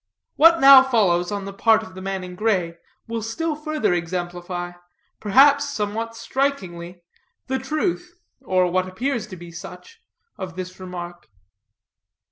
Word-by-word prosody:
What 330 +1 +6
now 275 -2 +10
follows 205 -9 +1
on 200 -1 -4
the 195 - -7
part 225 +2 +3
of 185 - -12
the 185 - -9
man 195 -1 -4
in 180 0 -8
gray 180 -4 -1 0.3
will 230 0 -3
still 300 +9 -3
further 305 - -1
exemplify, 175 0 -4 0.5
perhaps 280 +6 +4
somewhat 225 -2 -3
strikingly, 180 -11 -3 0.4
the 265 0 -2
truth, 345 +6 -3 0.2
or 185 -7 +1
what 185 +1 0
appears 235 +3 -3
to 190 - -9
be 175 -1 -11
such, 195 - -11 0.4
of 185 -3 -6
this 185 0 -7
remark. 175 -5 -8
200 Hz, 140 wpm, -22 LUFS, 180-265 Hz, 0.5 s, now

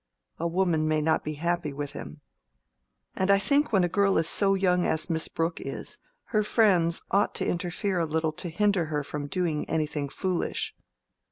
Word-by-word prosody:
A 170 - 0
woman 170 -3 +1
may 155 0 +2
not 160 +1 +1
be 155 0 -4
happy 170 0 -1
with 145 0 -5
him. 150 +1 -9 0.9
And 190 +1 0
I 200 - +7
think 280 +7 +2
when 195 -4 +4
a - - +3
girl 195 +2 +2
is 160 - +2
so 195 +1 +2
young 180 -2 +2
as 160 +1 0
Miss 160 -1 -1
Brooke 165 0 -2
is, - - -5 0.3
her 215 - +4
friends 190 -6 +3
ought 200 +1 +2
to - - -1
interfere 180 +2 -1
a 165 - 0
little 160 0 0
to 175 - -5
hinder 200 0 +2
her 150 -2 -2
from 145 0 -5
doing 170 -3 -1
anything 150 -2 -1
foolish. 185 +3 -2
170 Hz, 185 wpm, -27 LUFS, 155-190 Hz, 0.9 s, I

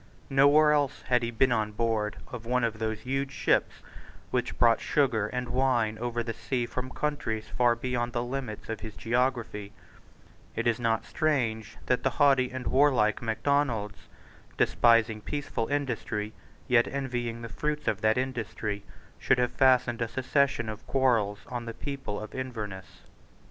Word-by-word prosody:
Nowhere 145 +3 +6
else 145 -2 +1
had 125 -1 +2
he 115 - -1
been 120 +2 +2
on 110 -2 0
board 110 -1 0 0.2
of 120 -3 -6
one 125 +1 0
of 115 -2 -1
those 110 -1 -2
huge 135 +3 -2
ships - - 0 0.5
which 125 -1 -1
brought 115 -1 +4
sugar 120 -8 +1
and 125 +1 -4
wine 120 -4 +1
over 120 0 -2
the 115 0 -4
sea 120 +1 -2
from 125 +2 -5
countries 130 -7 -2
far 120 -1 +4
beyond 120 0 -2
the 120 0 -1
limits 125 -4 -5
of 115 - -4
his 110 -2 -8
geography, 115 -4 -1 0.8
It - - -2
is 120 0 +2
not 115 -1 0
strange 115 -8 -1
that 125 - +1
the 135 - +2
haughty 135 -3 +4
and 130 -1 -6
warlike 130 -6 +3
Macdonalds, 115 -2 -1 0.5
despising 115 -2 +3
peaceful 145 -3 -3
industry, 120 -7 -2 0.3
yet 125 -3 +4
envying 120 -4 -3
the - - -4
fruits 150 +4 -3
of 105 -1 0
that 110 +1 +3
industry, 115 -5 -3 0.4
should 135 - +3
have 125 0 +1
fastened 125 -3 +3
a 115 - +1
succession 130 -1 +1
of 110 +3 -7
quarrels 115 -7 +1
on 120 -1 -5
the 115 -1 -6
people 135 -8 -5
of 110 - -8
Inverness. 105 -8 -6
120 Hz, 160 wpm, -28 LUFS, 110-130 Hz, 0.8 s, Nowhere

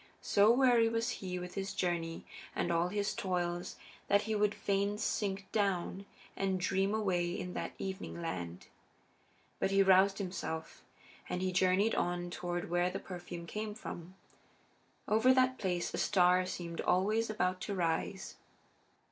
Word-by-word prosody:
So 205 +2 +5
weary 240 -2 +5
was 230 +1 0
he 180 -2 -3
with 180 0 -6
his 195 0 -4
journey 170 -2 -2 0.3
and 175 - 0
all 170 +1 +2
his 205 +2 -1
toils 175 -2 -2 0.3
that 200 +1 +4
he 220 +1 -2
would 210 -1 +2
fain 200 +1 0
sink 200 -2 -1
down 195 -1 -1 0.3
and 190 -1 0
dream 195 +3 +1
away 180 -5 +1
in 180 0 -5
that - - -4
evening 190 -2 -5
land. 90 - -5 0.9
But - - +1
he 195 0 +4
roused 195 +1 +5
himself, 180 -4 -5 0.5
and 180 - -2
he 185 - +1
journeyed 185 +4 +3
on 175 0 -1
toward 175 -1 -3
where 175 0 +2
the - - -4
perfume 175 -2 -7
came 210 +4 -4
from. 180 -4 -8 0.9
Over 225 +5 +5
that 255 0 +3
place 180 -3 -1
a - - -2
star 180 -1 +4
seemed 170 -2 -4
always 215 +5 +2
about 185 -3 0
to 200 - -3
rise. 175 +2 -2
190 Hz, 150 wpm, -33 LUFS, 175-205 Hz, 0.9 s, So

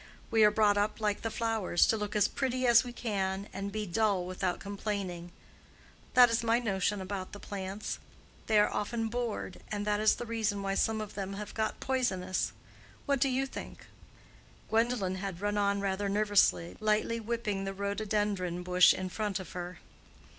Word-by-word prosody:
We 225 -1 +5
are 210 - +8
brought 210 -1 +3
up 210 +2 0
like 210 -2 0
the 225 - -2
flowers, 220 -6 +1
to - - +2
look 210 -1 -4
as 210 - +4
pretty 255 -1 -1
as 235 0 +7
we 245 - -6
can, 200 -4 -2
and 200 +1 -4
be 215 +1 -3
dull 200 -1 +1
without 185 0 -2
complaining. 195 -4 -4 0.8
That 245 -2 +8
is 230 0 +1
my 230 0 +3
notion 205 -3 0
about 190 0 -5
the 205 - -7
plants; 200 +1 -5 0.5
they 220 - +3
are 210 - +4
often 225 +1 -1
bored, 235 -5 -3
and 205 -1 -2
that 210 0 +1
is 215 0 +4
the 240 - -6
reason 220 -3 -1
why 195 0 -1
some 220 +2 +1
of 210 -1 -7
them 195 -1 -4
have 205 +1 -6
got 220 -1 -2
poisonous. 190 -9 0 0.5
What 280 -2 +1
do 275 - +4
you 265 +1 +1
think?" 270 - -8 0.9
Gwendolen 220 -5 +1
had 190 -2 -5
run 205 +1 -1
on 200 -1 +1
rather 200 0 -1
nervously, 205 -4 +3
lightly 215 +2 +1
whipping 215 -3 -2
the 195 - -3
rhododendron 200 -3 -1
bush 180 0 +6
in 185 - -3
front 205 0 -2
of 190 - -8
her. 180 0 -6
205 Hz, 180 wpm, -31 LUFS, 195-225 Hz, 0.9 s, are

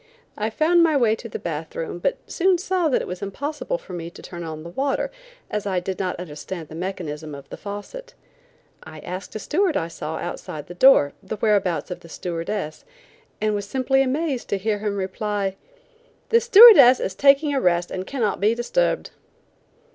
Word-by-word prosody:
I 215 +1 -2
found 325 +8 +3
my 320 -3 +4
way 225 -4 +3
to 230 - -9
the - - -5
bath 160 -1 -5
room, 165 +1 -4
but - - 0
soon 370 0 +2
saw 360 -2 0
that 260 - +1
it - - -7
was 180 0 -6
impossible 290 - -3
for - - -12
me 170 -1 -5
to 175 - -13
turn 175 -1 -8
on 155 -1 -6
the 170 - -8
water, 275 - -1 0.4
as 210 -1 -2
I 185 -2 0
did 185 +1 -5
not 185 -2 -1
understand 165 0 -7
the - - -10
mechanism 160 -4 -5
of 140 - -11
the - - -7
faucet. 215 - -8 0.7
I 155 -1 -11
asked 185 +4 -7
a - - -1
steward 340 - 0
I 165 - -2
saw 160 -1 -5
outside 155 -6 -6
the 175 - -9
door, 180 - +5
the 200 +3 -5
whereabouts 200 -5 0
of 180 - -5
the 170 - -15
stewardess, 170 0 -4 0.6
and 215 0 0
was 205 -1 -3
simply 265 +3 +1
amazed 270 0 -1
to 200 - 0
hear 210 +1 -1
him 205 -1 -2
reply: 195 0 -2 0.7
"The 465 +1 +4
stewardess 405 - +9
is 190 - -2
taking 285 +1 +4
a 270 - +1
rest 175 0 +1
and 185 0 -5
cannot 230 -8 -1
be 215 +3 +3
disturbed." 245 - 0
205 Hz, 195 wpm, -23 LUFS, 175-275 Hz, 0.7 s, stewardess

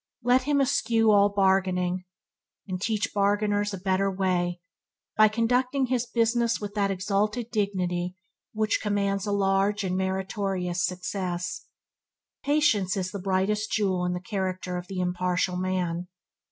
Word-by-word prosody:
Et 250 +1 +5
him 285 +2 +1
eschew 240 -5 +3
all 205 0 +5
bargaining, 185 -2 +1 0.6
and 185 -1 -4
teach 215 -1 -1
bargainers 205 0 +1
a 195 - -4
better 190 +1 +1
way 180 -2 0 0.6
by 215 0 +7
conducting 250 +5 +1
his 250 -1 -1
business 235 0 +1
with 205 -1 -6
that 200 -2 +1
exalted 210 +5 -1
dignity 180 -4 -1 0.4
which 215 -1 0
commands 200 -1 0
a - - 0
large 200 +1 +1
and 185 -1 -1
meritorious 190 -1 -1
success. 180 0 -3 0.8
Patience 220 -10 +2
is 185 -1 -2
the 200 - -5
brightest 195 +3 0
jewel 190 -4 +1
in 180 0 0
the 180 - -3
character 185 -1 -3
of 180 0 -5
the 190 -1 -5
impartial 180 0 0
man. 180 -1 -2
195 Hz, 140 wpm, -26 LUFS, 185-215 Hz, 0.8 s, by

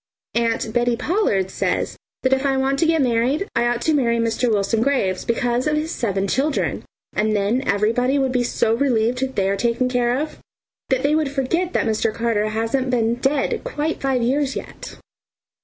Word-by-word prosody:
Aunt 230 -1 0
Bettie 240 0 +2
Pollard 250 - 0
says - - -1 0.3
that 260 0 +3
if 265 +1 +1
I 270 -1 +1
want 270 +1 0
to 325 - +3
get 325 -3 +3
married 255 - +1
I 235 +1 +2
ought 240 0 -1
to 315 - +2
marry 235 -5 +2
Mr. 230 +1 0
Wilson 215 +2 +1
Graves 230 -9 0
because 240 +3 0
of 300 - +1
his 315 +2 -2
seven 200 - -1
children, 275 +8 0 0.3
and 215 0 +1
then 210 +5 +1
everybody 230 +7 +2
would 265 -2 +1
be 250 -1 +1
so 225 -2 +1
relieved 240 -1 +1
that 265 0 -2
they 195 -1 +1
are 195 - +1
taken 235 +4 0
care 245 0 +1
of, 305 +1 -5 0.5
that 260 -1 +1
they 285 +2 +2
would 310 -2 +1
forget 315 +7 -1
that - - +1
Mr. 220 0 +1
Carter 220 -2 0
hasn't 230 +4 -1
been 230 -2 +1
dead 270 +3 0
quite 320 -10 -3
five 265 -3 +1
years 270 +3 0
yet. - - -8
245 Hz, 190 wpm, -21 LUFS, 230-275 Hz, 0.5 s, that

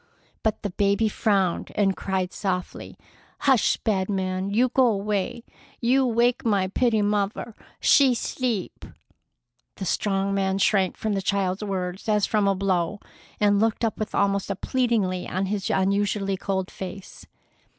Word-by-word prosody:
But 220 -2 -1
the 205 - -2
baby 200 +3 +2
frowned 195 -4 0
and 195 -2 +2
cried 190 -1 -2
softly: 180 -3 -4 0.4
"Hush, 265 -5 +3
bad 195 -3 -1
man! 190 -1 -1
You 240 +5 +2
go 255 +1 +4
away! 210 +1 -1 0.4
You 255 +2 +3
wake 240 +1 +2
my 200 -4 +1
pitty 220 0 +1
muvver! 205 +2 -1 0.3
She's 260 -4 +4
's'eep!" 235 -8 -3 0.9
The 190 - -5
strong 195 +2 0
man 195 -1 0
shrank 195 -2 +2
from 215 -1 -2
the 195 - -1
child's 195 0 -1
words 190 0 -4
as 210 -1 +3
from 210 -2 +1
a 195 - +2
blow, 190 0 0 0.4
and 205 -1 +3
looked 225 +1 +1
up 225 - -2
with 215 - -3
almost 200 -1 +1
a 200 - -1
pleading 235 -1 +1 0.2
on 190 +2 -1
his 195 0 -2
usually 195 +1 +1
cold 190 0 -3
face. 190 0 -9
200 Hz, 150 wpm, -25 LUFS, 190-220 Hz, 0.9 s, go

